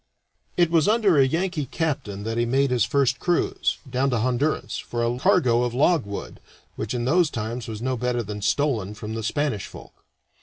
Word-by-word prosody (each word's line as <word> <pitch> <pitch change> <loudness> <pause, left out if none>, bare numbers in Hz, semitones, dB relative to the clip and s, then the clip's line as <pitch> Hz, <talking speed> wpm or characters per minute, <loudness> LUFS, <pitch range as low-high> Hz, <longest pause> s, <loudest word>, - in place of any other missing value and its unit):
It 175 -2 +3
was 165 -3 +3
under 210 -7 +4
a 135 - +5
Yankee 165 -1 -1
captain 135 - -3
that 115 +1 -3
he - - +3
made 135 +3 +1
his 120 -4 +3
first 135 -2 +1
cruise 175 -1 0
down 130 +2 0
to 125 - +1
Honduras, 130 +6 -1
for 120 0 -3
a 120 +1 -1
cargo 120 -2 +3
of 120 -1 -1
logwood, 135 - 0 0.4
which 110 +3 -4
in 120 -1 -1
those 165 +4 +3
times 115 0 -4
was 110 0 -6
no 130 0 0
better 125 0 -1
than 105 0 -6
stolen 110 -3 0
from 105 +1 -6
the 115 - -3
Spanish 140 - -1
folk. - - -12
125 Hz, 190 wpm, -24 LUFS, 115-150 Hz, 0.4 s, a